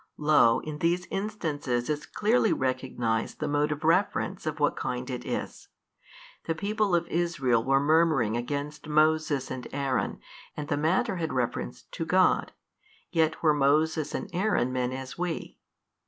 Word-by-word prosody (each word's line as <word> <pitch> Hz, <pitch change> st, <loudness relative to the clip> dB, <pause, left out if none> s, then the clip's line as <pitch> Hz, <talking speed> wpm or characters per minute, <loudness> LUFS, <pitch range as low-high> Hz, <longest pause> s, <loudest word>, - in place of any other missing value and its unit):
Lo 150 Hz, -6 st, +4 dB
in 150 Hz, -1 st, -6 dB
these 175 Hz, +2 st, +1 dB
instances 155 Hz, -, -2 dB
is 150 Hz, -1 st, -3 dB
clearly 220 Hz, +1 st, +2 dB
recognized 125 Hz, -3 st, -1 dB
the 155 Hz, -, -2 dB
mode 145 Hz, +1 st, +1 dB
of 150 Hz, +1 st, -4 dB
reference 170 Hz, +5 st, +1 dB
of -, -, -3 dB
what -, -, +2 dB
kind -, -, -3 dB
it -, -, -4 dB
is. -, -, -5 dB, 0.8 s
The 165 Hz, -, -1 dB
people 205 Hz, +1 st, 0 dB
of 170 Hz, 0 st, +1 dB
Israel 145 Hz, -10 st, +1 dB
were 135 Hz, +2 st, +3 dB
murmuring 150 Hz, -6 st, +3 dB
against 145 Hz, +5 st, -4 dB
Moses 155 Hz, -3 st, +2 dB
and 125 Hz, -1 st, -5 dB
Aaron 135 Hz, -3 st, -1 dB, 0.4 s
and 145 Hz, -1 st, -5 dB
the 145 Hz, -, +1 dB
matter 165 Hz, +5 st, +1 dB
had 160 Hz, -2 st, -2 dB
reference 115 Hz, -, -2 dB
to -, -, -6 dB
God, -, -, +3 dB, 0.6 s
yet 160 Hz, -1 st, +1 dB
were 155 Hz, -2 st, +5 dB
Moses 150 Hz, +2 st, +2 dB
and -, -, -3 dB
Aaron 175 Hz, -, +1 dB
men 125 Hz, -1 st, 0 dB
as 130 Hz, +1 st, -7 dB
we. 175 Hz, -2 st, -4 dB
150 Hz, 155 wpm, -28 LUFS, 130-165 Hz, 0.8 s, were